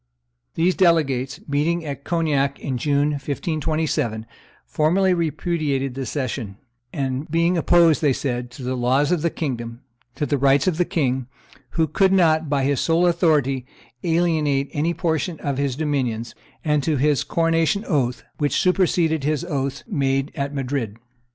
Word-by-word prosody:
These 175 Hz, +3 st, +2 dB
delegates, 145 Hz, -6 st, +2 dB
meeting 160 Hz, +4 st, 0 dB
at 140 Hz, -1 st, -6 dB
Cognac 145 Hz, -5 st, 0 dB
in 130 Hz, -3 st, -3 dB
June, 145 Hz, +2 st, +1 dB
1527, 145 Hz, -5 st, -2 dB, 0.4 s
formally 185 Hz, +5 st, +2 dB
repudiated 155 Hz, -5 st, -1 dB
the 135 Hz, -1 st, -4 dB
cession, 120 Hz, -6 st, -4 dB, 0.7 s
being 170 Hz, +3 st, +2 dB
opposed, 170 Hz, -1 st, +4 dB
they 145 Hz, -3 st, +3 dB
said, 125 Hz, -2 st, -2 dB
to 130 Hz, -, -9 dB
the 125 Hz, +1 st, -2 dB
laws 130 Hz, +5 st, +2 dB
of 175 Hz, -3 st, +1 dB
the 170 Hz, -, +1 dB
kingdom, 120 Hz, -7 st, -4 dB, 0.3 s
to 150 Hz, -, -1 dB
the 145 Hz, -1 st, 0 dB
rights 140 Hz, +1 st, +4 dB
of 180 Hz, -4 st, +1 dB
the 180 Hz, -, +2 dB
king, 130 Hz, -7 st, -1 dB, 0.5 s
who 165 Hz, -, +4 dB
could 190 Hz, +5 st, +2 dB
not 160 Hz, -5 st, +3 dB
by 140 Hz, -2 st, +1 dB
his 140 Hz, 0 st, +1 dB
sole 165 Hz, +2 st, +2 dB
authority 150 Hz, -7 st, +2 dB, 0.4 s
alienate 160 Hz, -5 st, +1 dB
any 165 Hz, +4 st, 0 dB
portion 165 Hz, -1 st, -1 dB
of 140 Hz, -1 st, -2 dB
his 140 Hz, -3 st, 0 dB
dominions, 130 Hz, -7 st, -2 dB, 0.3 s
and 150 Hz, -1 st, +2 dB
to 150 Hz, +1 st, 0 dB
his 145 Hz, +1 st, +2 dB
coronation 165 Hz, +5 st, +1 dB
oath, 130 Hz, -, 0 dB, 0.2 s
which 145 Hz, -1 st, +1 dB
superseded 175 Hz, -4 st, +2 dB
his 155 Hz, +3 st, 0 dB
oaths 140 Hz, -4 st, -3 dB
made 135 Hz, -, 0 dB
at 140 Hz, -1 st, -3 dB
Madrid. 130 Hz, -6 st, -3 dB
145 Hz, 150 wpm, -22 LUFS, 135-165 Hz, 0.7 s, opposed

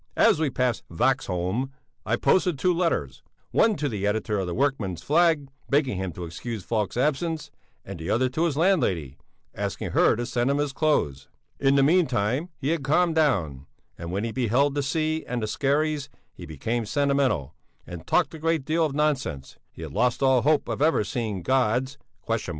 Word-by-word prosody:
As -, -, +5 dB
we 160 Hz, -3 st, +1 dB
passed 125 Hz, -2 st, 0 dB
Vaxholm, 100 Hz, -, 0 dB, 0.4 s
I 115 Hz, -, +2 dB
posted 180 Hz, +4 st, +2 dB
two 180 Hz, +7 st, +2 dB
letters; 165 Hz, -, -1 dB, 0.3 s
one 225 Hz, -2 st, +3 dB
to 150 Hz, -1 st, -2 dB
the 105 Hz, -5 st, -2 dB
editor 105 Hz, 0 st, -1 dB
of 95 Hz, -, -2 dB
the 85 Hz, -, -3 dB
Workman's 110 Hz, -, -1 dB
Flag, 160 Hz, -, +3 dB, 0.2 s
begging 140 Hz, -7 st, +1 dB
him 95 Hz, -1 st, -3 dB
to 90 Hz, -, -7 dB
excuse 100 Hz, +6 st, -6 dB
Falk's 110 Hz, 0 st, -2 dB
absence, 155 Hz, +4 st, -1 dB, 0.3 s
and -, -, -8 dB
the 80 Hz, -, -5 dB
other 130 Hz, +3 st, +2 dB
to 155 Hz, +7 st, 0 dB
his 150 Hz, -4 st, -1 dB
landlady, 100 Hz, -, +1 dB, 0.3 s
asking -, -, -4 dB
her -, -, +4 dB
to 120 Hz, +2 st, -3 dB
send 120 Hz, +1 st, 0 dB
him 140 Hz, -, +1 dB
his 145 Hz, -1 st, -1 dB
clothes. 135 Hz, -, 0 dB, 0.3 s
In 135 Hz, 0 st, +3 dB
the 140 Hz, -, +4 dB
meantime 135 Hz, -, +2 dB
he 140 Hz, -1 st, -2 dB
had 165 Hz, -3 st, 0 dB
calmed 165 Hz, +4 st, +2 dB
down, 85 Hz, -, 0 dB, 0.3 s
and 85 Hz, 0 st, -7 dB
when 100 Hz, +3 st, -2 dB
he 115 Hz, -, -2 dB
beheld 130 Hz, +4 st, +1 dB
the 145 Hz, -, 0 dB
sea 155 Hz, +3 st, -1 dB
and 125 Hz, -, -2 dB
the -, -, -1 dB
skerries, 145 Hz, +4 st, 0 dB, 0.2 s
he -, -, -10 dB
became 110 Hz, -, -3 dB
sentimental 140 Hz, -, +1 dB, 0.3 s
and 85 Hz, -2 st, -9 dB
talked 175 Hz, -, +2 dB
a 160 Hz, -, -8 dB
great 165 Hz, -3 st, 0 dB
deal 165 Hz, +2 st, +1 dB
of 150 Hz, -3 st, -1 dB
nonsense: 135 Hz, -, -1 dB
he -, -, -10 dB
had -, -, -7 dB
lost 120 Hz, +5 st, +1 dB
all 130 Hz, -2 st, +4 dB
hope 150 Hz, +2 st, +2 dB
of -, -, -3 dB
ever 155 Hz, -7 st, +3 dB
seeing 105 Hz, -3 st, -3 dB
God's 130 Hz, +3 st, +1 dB
130 Hz, 185 wpm, -25 LUFS, 105-150 Hz, 0.4 s, As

